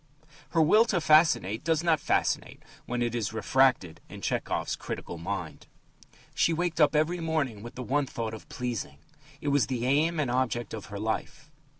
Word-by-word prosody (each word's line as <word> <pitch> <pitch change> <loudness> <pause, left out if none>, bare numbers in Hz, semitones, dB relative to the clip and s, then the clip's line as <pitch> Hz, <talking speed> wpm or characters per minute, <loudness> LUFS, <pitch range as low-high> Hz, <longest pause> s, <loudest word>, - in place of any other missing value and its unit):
Her 165 -2 +3
will 215 +9 +5
to 195 -6 0
fascinate 155 - +3
does 160 0 +1
not 165 -3 +3
fascinate - - -1 0.2
when 120 0 -1
it 120 -1 -1
is 115 -2 -2
refracted 115 -7 +2
in - - -10
Tchehov's - - -1
critical 85 - -6
mind: 100 +3 -5 0.7
She 170 - +2
waked 165 0 -1
up 150 +1 +4
every 160 +4 +1
morning 155 -10 -1
with 120 +2 -9
the 125 - -5
one 140 +3 0
thought 115 -3 -4
of 110 - -10
"pleasing." 115 - -4 0.4
It 145 - -1
was 145 -1 +2
the 125 -2 -2
aim 155 +5 +2
and 135 -5 0
object 120 -3 -1
of 110 -3 -6
her 100 - -7
life. 110 +7 -4
130 Hz, 180 wpm, -28 LUFS, 115-160 Hz, 0.7 s, will